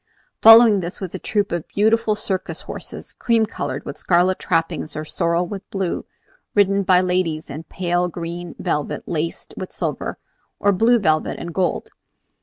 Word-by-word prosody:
Following 225 -2 +9
this 175 +1 -5
was 190 -4 -6
a - - -4
troupe 205 -2 -1
of 170 -2 -3
beautiful 220 +1 +2
circus 190 -3 -3
horses, - - -8
cream 230 -2 +2
colored 215 - -5
with - - -7
scarlet 180 +1 +2
trappings, 165 -3 -1
or 155 - -4
sorrel 170 +2 0
with 195 +1 -8
blue, 195 -3 -2 0.5
ridden 200 -1 +4
by 185 -2 +4
ladies 180 -5 -1
in 155 +4 -7
pale 175 0 -1
green 175 0 -6
velvet 150 - -3
laced 165 0 -3
with - - -6
silver, - - -3 0.4
or 205 - +3
blue 225 +5 +4
velvet 155 -7 +1
and 170 0 -6
gold. 180 +1 -1
180 Hz, 160 wpm, -21 LUFS, 170-205 Hz, 0.5 s, Following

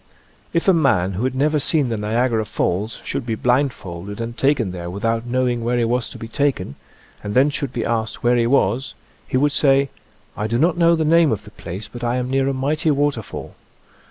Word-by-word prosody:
If 170 +2 0
a 190 - +7
man 120 - +2
who 105 +7 -2
had 130 0 -1
never 150 +3 +2
seen 145 -2 +2
the 115 - -1
Niagara 110 +2 0
Falls 105 +1 -2
should 140 - -2
be 115 -2 -2
blindfolded 105 -7 -1
and 115 0 -4
taken 135 -8 +1
there 85 -1 -6
without 115 +5 -2
know 130 +1 +1
ing 120 -1 -1
where 120 +1 0
he 120 - +2
was 120 0 0
to - - -9
be 115 - -7
taken, 120 - -1 0.5
and 105 0 -4
then 135 +3 +4
should 140 -2 -2
be 120 -3 -3
asked 110 -1 -2
where 120 +1 +4
he 120 -1 +2
was, 125 0 +1 0.3
he - - 0
would 145 +2 +3
say: 140 -1 +3 0.2
" 100 -1 -35
I 105 - -2
do 115 +2 0
not 160 +6 +3
know 170 -1 +4
the 160 -1 0
name 165 -1 +4
of 105 -2 -2
the 105 - -13
place, 95 +1 -7
but 120 +2 -9
I 120 +1 0
am 125 0 -2
near 135 0 +2
a - - +1
mighty 150 +4 0
waterfall." 145 -6 -1
120 Hz, 225 wpm, -21 LUFS, 110-140 Hz, 0.5 s, a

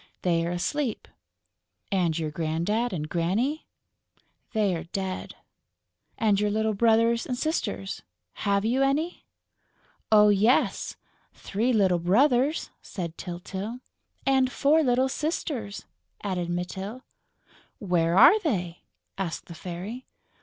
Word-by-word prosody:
"They're 170 -1 +1
asleep." 220 +8 -2 0.8
"And 175 -5 +1
your 155 -2 -2
Grandad 170 +10 -1
and 155 -5 -3
Granny?" 205 - -1 0.8
"They're 200 -7 0
dead...." 190 +1 -4 0.8
"And 210 -3 +2
your 210 0 +1
little 220 +1 +1
brothers 230 +2 +3
and 250 - -2
sisters.... 215 -10 -2 0.4
Have 200 0 +1
you 250 +4 +2
any?..." 290 +6 0 0.8
"Oh, 210 -1 +7
yes, 210 +5 +2 0.4
three 225 +6 -1
little 190 -6 +3
brothers!" 250 - +2
said 170 -4 -6
Tyltyl. 190 +6 -6 0.5
"And 265 -1 +3
four 295 +5 +3
little 255 -2 +3
sisters," 265 -7 -3 0.4
added 180 -4 -2
Mytyl. 190 +7 -4 0.7
"Where 175 -3 +1
are 360 - +8
they?" 180 - -2 0.4
asked 180 -4 -3
the 170 - -10
Fairy. 185 +9 -7
205 Hz, 110 wpm, -26 LUFS, 180-250 Hz, 0.8 s, are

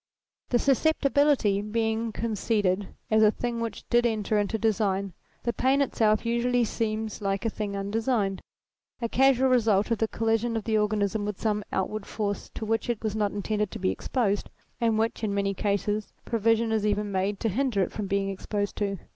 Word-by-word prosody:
The 245 - +3
susceptibility 275 -5 +3
being 220 +1 -1
conceded 205 -3 0 0.2
as 220 0 +5
a 215 - +7
thing 235 +2 -3
which 230 -3 -5
did 240 0 +5
enter 215 -2 +1
into 205 +2 0
design, 200 -4 0 0.3
the 235 - 0
pain 265 +5 +2
itself 220 -6 +2
usually 240 +1 +2
seems 220 -1 -2
like 195 +2 -1
a 225 - +1
thing 205 -2 -4
undesigned; 205 -1 0 0.6
a 235 - -1
casual 265 +1 +4
result 220 -4 +3
of 230 - +1
the 225 - +2
collision 225 +1 0
of 220 - -3
the 220 0 0
organism 210 0 +1
with 205 -1 -4
some 210 -2 0
outward 200 +2 -2
force 205 -2 -3
to 220 - -4
which 225 +2 -1
it 235 -2 -2
was 215 -1 -1
not 210 -2 +1
intended 210 +1 -1
to - - -7
be 95 - 0
exposed, 205 - -1 0.3
and 230 -2 +2
which, 225 +1 -1
in 205 -2 0
many 200 0 0
cases, 205 +1 -1
provision 225 0 +2
is 220 -2 +1
even 210 0 0
made 195 +1 -1
to 225 - +1
hinder 225 -2 +1
it - - -3
from 210 -2 -4
being 195 0 0
exposed 205 +1 -3
to. 200 -1 -1
215 Hz, 185 wpm, -27 LUFS, 205-230 Hz, 0.6 s, a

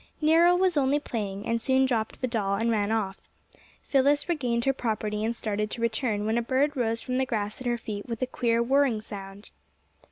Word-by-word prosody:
Nero 330 +3 +5
was 365 -2 +2
only 280 +1 +3
playing, 205 -7 -4
and 230 0 0
soon 265 +1 +3
dropped 230 -4 -2
the 255 - +1
doll 205 -5 0
and 230 +3 0
ran 210 -1 0
off. 205 -4 -2 0.6
Phyllis 280 +2 +2
regained 245 -9 0
her 270 - +3
property 215 -4 -2
and 230 +2 -1
started 210 -1 -2
to 235 - -5
return, 220 -2 0
when 220 +2 +1
a - - 0
bird 270 +5 +1
rose 230 -3 0
from 255 0 -1
the 265 - +2
grass 215 -1 -3
at 255 - -4
her 240 0 +1
feet 210 -3 -6
with 230 -1 -3
a - - +3
queer 235 -2 0
whirring 265 -2 +2
sound. 200 -1 -9
230 Hz, 210 wpm, -27 LUFS, 215-265 Hz, 0.6 s, Nero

